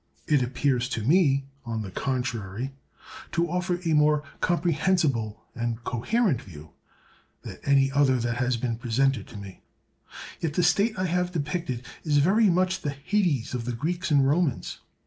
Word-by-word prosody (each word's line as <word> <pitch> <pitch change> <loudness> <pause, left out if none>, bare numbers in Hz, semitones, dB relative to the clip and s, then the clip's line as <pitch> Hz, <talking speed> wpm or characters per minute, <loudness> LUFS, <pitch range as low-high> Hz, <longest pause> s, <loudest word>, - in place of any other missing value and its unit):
It 150 -3 +3
appears 125 0 0
to 110 - -3
me, 140 - +3 0.2
on 115 -2 -3
the 95 - -7
contrary, 125 -1 -3 0.6
to 170 0 +1
offer 180 0 -1
a 165 - +2
more 150 0 +4 0.2
comprehensible 160 - +1
and 115 0 -3
coherent 155 - 0
view 75 -5 -12 0.7
than - - -8
any 135 -1 +4
other 135 -2 +3
that 120 0 -2
has 125 -1 +1
been 115 -1 -2
presented 125 -1 0
to - - -10
me; 100 -2 -10 0.8
yet 155 -3 -2
the 180 - +2
state 200 +6 +2
I 185 - 0
have 180 0 0
depicted 150 -6 -3 0.2
is 150 -2 +2
very 200 +9 +4
much 185 +1 +1
the 145 - -2
hades 170 - 0
of 120 -2 -3
the 125 - -2
Greeks 170 +9 -2
and 140 -3 +4
Romans. 150 -2 0
140 Hz, 160 wpm, -26 LUFS, 120-175 Hz, 0.8 s, more